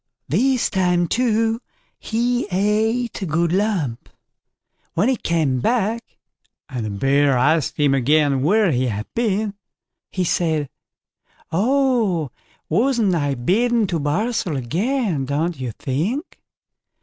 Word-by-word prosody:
This 250 - +1
time 180 -2 +1
too 225 +1 +1 0.4
he 240 +2 -1
ate 215 +5 0
a - - -1
good 165 +2 +1
lump. 180 - -1 0.9
When 195 +9 +2
he 265 - +2
came 160 - 0
back, 230 - -1 0.5
and 125 -6 -5
the 110 - -3
Bear 135 +6 +2
asked 150 +5 +1
him 145 -2 +3
again 140 +1 +2
where 200 +5 +3
he 130 -1 +1
had 105 -1 -3
been, 215 -3 0 0.6
he 185 - -2
said: 160 -5 0 0.8
"Oh, 220 - +1 0.4
wasn't 225 - +2
I 145 -4 0
bidden 225 - +1
to 170 -4 -2
barsel 175 - -1
again, 175 - -1
don't 155 +4 -2
you 125 -2 -3
think." 195 - -3
180 Hz, 120 wpm, -21 LUFS, 145-225 Hz, 0.9 s, him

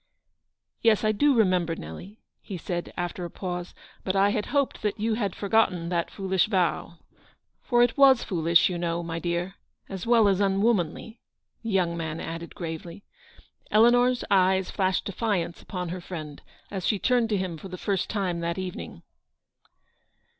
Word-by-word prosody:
" - - -54 0.3
Yes, 225 -2 +3
I 215 - +3
do 280 +6 +3
remember, 180 -6 +2
Nelly," 170 - -9 0.2
he 195 - -6
said, 175 +1 -4
after 175 +1 -3
a 175 - -4
pause; 180 0 -5
" - - -27
but 190 - -1
I 200 +1 +4
had 210 0 -2
hoped 280 -2 0
that 210 -1 -2
you 220 +1 0
had 205 -4 -2
forgotten 195 -5 +1
that 170 -1 -1
foolish 190 -1 0
vow. 180 -4 0 0.6
For 240 -2 +3
it 240 -1 +1
was 270 -3 +7
foolish, 170 -2 +3
you 180 -2 -3
know, 170 0 -1
my 165 0 -4
dear, 175 +2 -3 0.3
as 190 +1 -6
well 230 -3 +5
as 195 -1 +2
unwomanly," 200 +1 0 0.4
the 230 - -5
young 180 -4 +1
man 160 -1 -4
added 165 +1 -6
gravely. 170 +1 -6 0.7
Eleanor 240 +3 +5 0.2
eyes 190 -1 +3
flashed 190 -2 0
defiance 200 -5 -2
upon 180 -2 -5
her 180 +1 -5
friend, 155 -5 -7 0.3
as 190 -3 -3
she 210 - +2
turned 245 +1 +2
to 210 - +1
him 185 -3 -3
for 195 - -8
the 185 -1 -7
first 195 0 -1
time 185 -5 -1
that 170 +1 -2
evening. 185 -1 -6
190 Hz, 170 wpm, -26 LUFS, 170-210 Hz, 0.7 s, was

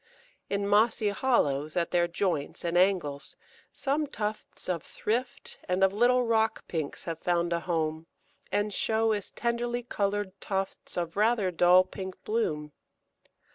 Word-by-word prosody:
In 200 0 -1
mossy 215 +1 +3
hollows 155 - +1
at 170 -1 0
their 175 -1 +3
joints 170 -4 -2
and 170 0 -1
angles, 175 -7 +1 0.4
some 285 +2 -1
tufts 215 -3 -5
of 175 -3 -1
Thrift 240 - -3
and 180 +1 +1
of 195 0 +4
little 245 +4 +4
Rock 225 -1 +1
Pinks 155 -4 -4
have 165 -2 -4
found 170 0 +1
a 170 - +1
home, 160 -2 -2 0.4
and 205 0 0
show 225 +2 +2
as 205 -2 -2
tenderly 240 +1 -2
coloured 205 -3 -1
tufts 195 -2 -3
of 170 -1 -2
rather 210 -3 +3
dull 180 +2 +6
pink 190 0 -7
bloom. 155 -10 -1
195 Hz, 140 wpm, -29 LUFS, 170-220 Hz, 0.4 s, dull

